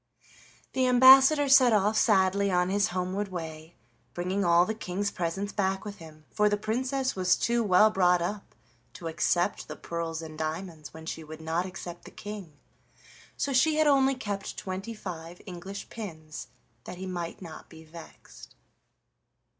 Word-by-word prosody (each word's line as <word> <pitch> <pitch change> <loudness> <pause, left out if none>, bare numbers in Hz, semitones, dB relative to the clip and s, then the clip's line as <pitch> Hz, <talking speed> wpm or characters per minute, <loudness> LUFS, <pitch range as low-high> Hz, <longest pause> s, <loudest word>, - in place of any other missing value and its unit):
The 260 -1 +2
ambassador 265 +4 +7
set 260 -3 +6
off 210 +1 +2
sadly 200 -2 +3
on 180 0 +1
his 200 +1 +2
homeward 185 +3 -2
way, 160 -3 -8 0.4
bringing 185 +3 -1
all 170 0 +5
the 220 - -2
King's 205 -1 -3
presents 185 +4 -3
back 195 0 -1
with 205 -1 -7
him, 155 -2 -13
for 210 0 +2
the 205 - +1
Princess 260 +5 -1
was 185 -1 +3
too 235 0 +1
well 210 +2 +5
brought 180 -3 +3
up 195 +4 -5 0.4
to 165 - -7
accept 170 +2 0
the - - -7
pearls 165 -1 -5
and 155 -1 -9
diamonds 160 0 -5
when 160 0 -11
she 160 0 -5
would 155 0 -10
not 165 +3 -2
accept 175 -2 -9
the - - -9
King, 200 -8 -9 0.8
so 280 - -1
she 305 +5 +3
had 310 0 +3
only 270 -2 +4
kept 205 -5 -5
twenty 195 +4 -5
five 175 -4 -8
English 190 +2 -8
pins 160 -9 -8 0.4
that 180 - -8
he 190 - -6
might 175 -2 -5
not 165 -4 -10
be 160 -1 -13
vexed. 160 +1 -14
190 Hz, 160 wpm, -28 LUFS, 170-210 Hz, 0.8 s, ambassador